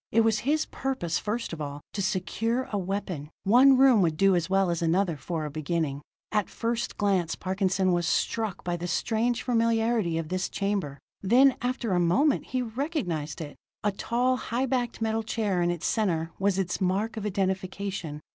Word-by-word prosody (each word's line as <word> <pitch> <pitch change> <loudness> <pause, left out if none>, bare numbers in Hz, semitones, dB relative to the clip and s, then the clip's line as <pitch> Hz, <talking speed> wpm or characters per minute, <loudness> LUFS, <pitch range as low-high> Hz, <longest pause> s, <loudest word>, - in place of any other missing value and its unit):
It 230 - +4
was 220 -1 +2
his 305 +6 +1
purpose, 260 -12 -2
first 215 -1 -3
of 160 - -6
all, 145 0 -5
to 200 - -2
secure 225 +7 -1
a 205 - 0
weapon; 180 -6 -4
one 255 +6 +6
room 260 -5 +6
would 160 -4 +1
do 195 +1 +4
as 170 0 0
well 195 -2 +2
as 170 - -2
another 170 +1 +1
for 160 +2 -4
a 150 - -5
beginning. 155 -2 -2 0.3
At 210 -2 0
first 235 0 -2
glance 190 -5 +1
Parkinson 190 0 0
was 175 -1 +1
struck 220 -5 -1
by 175 -1 -2
the 175 +1 -4
strange 230 +7 0
familiarity 230 -6 +1
of 165 -2 -3
this 185 +1 -1
chamber: 195 -8 -2 0.2
then, 255 +7 +5
after 245 -3 -2
a 180 - +2
moment, 260 - +2
he 255 -1 -2
recognized 220 - -3
it. 145 -2 -7 0.3
A 205 - +2
tall, 245 +5 0
high 250 +2 -1
backed 245 -3 -1
metal 220 0 0
chair 215 -4 -1
in 175 - +2
its 175 -2 -3
center 170 -7 0
was 195 -1 +2
its 185 -1 -1
mark 195 +5 0
of 220 - -5
identification. 190 -4 -2
195 Hz, 185 wpm, -27 LUFS, 175-230 Hz, 0.3 s, one